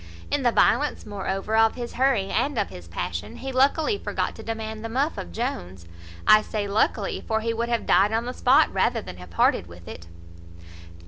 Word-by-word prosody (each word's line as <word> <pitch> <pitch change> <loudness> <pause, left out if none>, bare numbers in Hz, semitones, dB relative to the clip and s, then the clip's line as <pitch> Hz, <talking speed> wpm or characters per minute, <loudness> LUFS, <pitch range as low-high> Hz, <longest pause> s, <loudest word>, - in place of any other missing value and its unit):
In 290 - +1
the 245 -2 +3
violence, 295 +5 +2
moreover, 195 +1 -3
of 225 0 +4
his 240 -1 -6
hurry, 245 -7 +1
and 285 -3 0
of 205 - 0
his 85 -1 -11
passion, 90 +3 -5
he 270 - -6
luckily 285 +9 +2
forgot - - -2
to - - -10
demand 220 -1 -5
the 225 - -4
muff 275 +7 0
of 85 - -7
Jones: 90 +1 -4 0.4
I 215 - +7
say 210 -1 -3
luckily; 200 0 0
for 220 0 0
he 230 +1 -1
would 235 +1 -2
have 235 -1 -1
died 205 +2 +4
on 225 +1 0
the 250 - -4
spot 270 +6 +4
rather 225 -3 +1
than 90 - -9
have 90 0 -11
parted 85 0 +2
with 85 0 -14
it. 85 +1 -9
220 Hz, 200 wpm, -25 LUFS, 190-245 Hz, 0.4 s, I